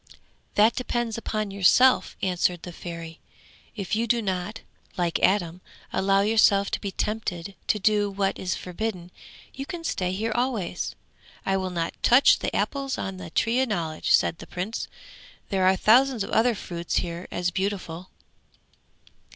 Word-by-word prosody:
'That 215 +3 +5
depends 240 -2 -2
upon 215 -2 -3
yourself,' 200 +7 +4
answered 180 -2 0
the 180 - -7
Fairy. 165 -1 -8 0.6
'If 200 -1 -2
you 230 +2 0
do 235 +1 +2
not, 195 +1 -3 0.4
like 175 -2 0
Adam, 180 -3 +1 0.3
allow 195 +1 +3
yourself 200 -1 +4
to - - -2
be 200 - -3
tempted 200 -3 -3
to - - +2
do 210 0 +2
what 195 0 -1
is 180 -2 -1
forbidden, 180 -1 -5 0.4
you 275 +1 -6
can 345 -1 -6
stay 180 - -1
here 220 +5 -2
always.' 240 -6 -2 0.5
'I 195 0 +1
will 190 -1 -2
not 170 -2 -2
touch 250 +3 +6
the - - -3
apples 275 -1 -1
on 190 0 -4
the 180 -2 -8
Tree 230 +9 +1
of 260 - 0
Knowledge,' 165 -6 -1
said 165 - -2
the - - -10
Prince. 190 +6 -4 0.6
'There 190 -2 +2
are 190 - +5
thousands 245 +3 +4
of - - -7
other 230 +1 +3
fruits 170 -3 -5
here 170 +1 -2
as 180 0 -1
beautiful.' 190 -2 -3
195 Hz, 160 wpm, -25 LUFS, 180-225 Hz, 0.6 s, touch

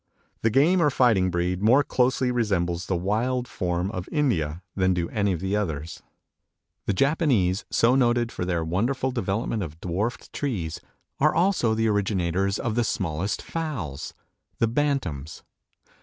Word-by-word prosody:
The 115 - +3
game 155 - +4
or 150 - +4
fighting 115 -9 +3
breed 90 +1 -1
more 125 +7 +5
closely 130 -1 +1
resembles 90 -7 0
the 95 - 0
wild 115 +8 0
form 90 +1 -2
of 90 -4 -5
India 90 - 0
than 95 -1 +2
do 85 -1 -1
any 100 -2 +1
of 90 -2 -2
the 95 +2 -1
others. 80 -6 -3 0.9
The 100 - +2
Japanese, 120 - +2
so 120 +2 +3
noted 120 -2 +2
for - - -4
their 85 -2 -1
wonderful 125 +10 0
development 115 -2 -1
of 80 -3 -6
dwarfed 95 +8 -3
trees, 95 - -3 0.4
are 150 +2 +3
also 170 - +2
the 115 0 +1
originators 100 -2 0
of 115 -4 -2
the 120 +1 +1
smallest 95 -2 -2
fowls 115 - -4 0.4
the 115 - +2
Bantams. 115 - -2
105 Hz, 150 wpm, -25 LUFS, 90-125 Hz, 0.9 s, more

